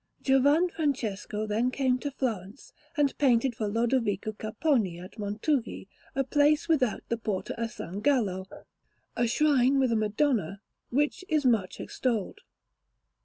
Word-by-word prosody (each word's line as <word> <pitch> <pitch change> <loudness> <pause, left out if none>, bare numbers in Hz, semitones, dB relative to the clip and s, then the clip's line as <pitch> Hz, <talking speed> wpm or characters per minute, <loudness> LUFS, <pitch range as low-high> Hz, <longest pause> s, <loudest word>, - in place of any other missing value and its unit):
Giovan 285 +6 +4
Francesco 220 - -2
then 220 +4 +1
came 255 -1 +1
to 285 - -3
Florence, 230 -5 -4 0.2
and 285 -2 +2
painted 255 -2 +3
for 220 -2 -3
Lodovico 225 -2 0
Capponi 215 - -1
at 185 +5 -11
Montughi, 215 +3 -2 0.3
a 270 - +2
place 290 +3 +2
without 270 -9 +1
the 230 - 0
Porta 210 -4 -3
a 230 - -1
San 195 -2 -7
Gallo, 205 -7 +1 0.7
a 240 - +1
shrine 275 0 +3
with 260 -3 +2
a - - +2
Madonna, 215 - 0 0.3
which 295 +7 0
is 305 -3 +1
much 220 -7 +1
extolled. 230 -6 -2
240 Hz, 135 wpm, -28 LUFS, 210-280 Hz, 0.7 s, Giovan